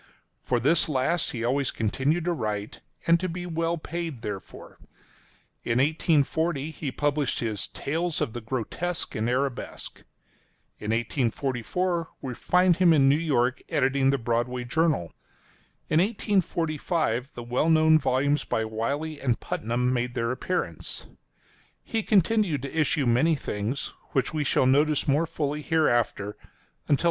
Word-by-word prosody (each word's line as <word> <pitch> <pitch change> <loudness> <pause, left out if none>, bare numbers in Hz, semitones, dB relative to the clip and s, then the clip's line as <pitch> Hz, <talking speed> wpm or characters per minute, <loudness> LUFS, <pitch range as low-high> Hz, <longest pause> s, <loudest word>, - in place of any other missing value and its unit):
For 125 - 0
this 155 +7 +3
last 150 +5 +1
he 115 -2 -4
always 130 +3 +1
continued 135 +10 0
to 175 - +1
write, 105 -7 -4 0.2
and 170 0 +5
to 185 +1 -2
be 175 +1 -5
well 165 0 -1
paid 160 -6 -5
therefor. 100 -3 -7 0.8
In 115 - 0
1840, 155 +1 +1
he 145 -3 -4
published 145 -1 0
his 110 -4 -2
"Tales 165 +3 -2
of 110 - -1
the 120 - -5
Grotesque 130 +9 -3
and 110 +2 -1
Arabesque." 130 +1 -3 0.8
In 105 - -5
1844, 135 +8 -1
we 130 -3 -5
find 180 +6 +3
him 180 -3 +5
in 140 -3 +5
New 140 - +5
York 130 -6 +1
editing 135 -3 +2
the 140 - +3
"Broadway 120 +1 -1
Journal." 145 - 0 0.7
In 155 - +3
1845, 165 - 0
the 120 - -6
well 125 +7 +1
known 160 0 +6
volumes 140 +2 +1
by 110 - -1
Wiley 140 +8 -3
and 125 -4 +1
Putnam 120 +3 -1
made 120 0 -1
their 115 -1 0
appearance. 130 +8 -3 0.8
He 225 - -1
continued 195 - +2
to 140 - -6
issue 150 -2 +2
many 125 +8 +3
things 115 0 -3
— - - -32
which 135 +1 0
we 155 -1 0
shall 130 - +2
notice 145 +3 +3
more 150 +4 +2
fully 150 -2 -2
hereafter, 120 -10 +1
until 105 - -18
1847. 145 - +5
140 Hz, 145 wpm, -26 LUFS, 120-160 Hz, 0.8 s, known